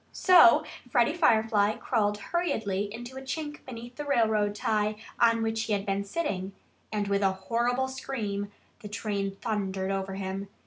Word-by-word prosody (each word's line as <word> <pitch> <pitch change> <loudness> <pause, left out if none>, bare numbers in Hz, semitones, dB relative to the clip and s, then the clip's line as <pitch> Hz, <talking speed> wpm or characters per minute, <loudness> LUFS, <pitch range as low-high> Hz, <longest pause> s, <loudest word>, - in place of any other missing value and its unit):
So 350 - +7 0.3
Freddie 240 +4 +3
Firefly 220 -9 +3
crawled 210 -4 0
hurriedly 210 - -1
into 240 +4 -8
a - - -6
chink 295 +2 -5
beneath 240 0 -9
the 295 - -3
railroad 220 -7 +2
tie 210 0 0 0.2
on 230 -1 +4
which 225 0 -1
he 220 - -1
had 200 -1 -1
been 195 0 -1
sitting. 200 - -3 0.4
And 210 -2 -1
with 200 0 +1
a 195 -1 +3
horrible 240 +6 0
scream 210 -6 -4 0.3
the 215 - -8
train 200 -2 -3
thundered 195 -3 -2
over 195 0 -2
him. 195 +1 -4
215 Hz, 160 wpm, -28 LUFS, 200-240 Hz, 0.4 s, So